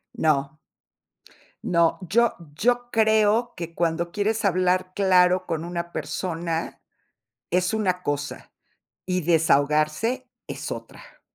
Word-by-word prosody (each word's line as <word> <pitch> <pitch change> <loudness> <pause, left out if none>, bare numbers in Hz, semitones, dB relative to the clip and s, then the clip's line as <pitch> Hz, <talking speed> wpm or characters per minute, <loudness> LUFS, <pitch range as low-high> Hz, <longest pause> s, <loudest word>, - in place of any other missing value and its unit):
No. 155 0 0 1.0
No, 170 -1 +2
yo 225 +7 +2 0.2
yo 245 +3 +1
creo 220 +1 +3
que 170 -1 -6
cuando 170 0 -1
quieres 215 +2 -1
hablar 185 -1 +1
claro 185 -1 +3
con 160 0 -3
una 170 0 -5
persona, 165 -2 -3 0.7
es 180 +4 +1
una 185 -4 -1
cosa, 145 0 -4 0.5
y 180 0 0
desahogarse 155 - +1 0.2
es - - -5
otra. - - -11
180 Hz, 105 wpm, -24 LUFS, 165-210 Hz, 1.0 s, creo